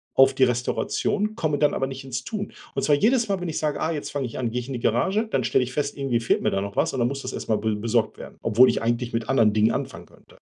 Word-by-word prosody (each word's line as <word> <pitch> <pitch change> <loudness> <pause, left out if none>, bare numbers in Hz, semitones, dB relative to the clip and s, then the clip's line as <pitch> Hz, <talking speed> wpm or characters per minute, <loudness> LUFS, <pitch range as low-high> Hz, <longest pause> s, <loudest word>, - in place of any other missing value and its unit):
auf 135 0 +6
die 135 - +3
Restauration, 130 - -1
komme 155 -9 0
dann 150 - +3
aber 135 - 0
nicht 135 0 -7
ins 130 -1 -4
Tun. 210 -2 -5 0.2
Und - - -1
zwar 145 - +4
jedes 230 - +2
Mal, 195 -1 0
wenn 175 - -3
ich 155 - -3
sage, 150 -1 -1
ah, 160 - 0
jetzt 150 - -5
fange 140 -3 -2
ich 115 - -8
an, 120 -3 -1
gehe 125 - -1
ich 120 - -10
in 135 - -5
die 125 - -3
Garage, 190 - +1
dann - - +1
stelle 130 - +2
ich 125 +1 -6
fest 145 +1 -2
irgendwie 135 -4 0
fehlt 115 - +1
mir - - +2
da 95 - 0
noch 100 0 -5
was - - +1
und 130 - -2
dann 120 - +3
muss 140 0 -5
das 130 - -5
erst - - -6
mal 110 - +3
be 110 0 -1
besorgt 115 +2 0
werden, - - -10
obwohl 115 +3 +5
ich - - 0
eigentlich 120 +1 -1
mit 115 -1 -2
anderen 115 -5 +4
Dingen 110 +2 +3
anfangen - - -4
könnte. - - -21
130 Hz, 305 wpm, -24 LUFS, 115-150 Hz, 0.2 s, auf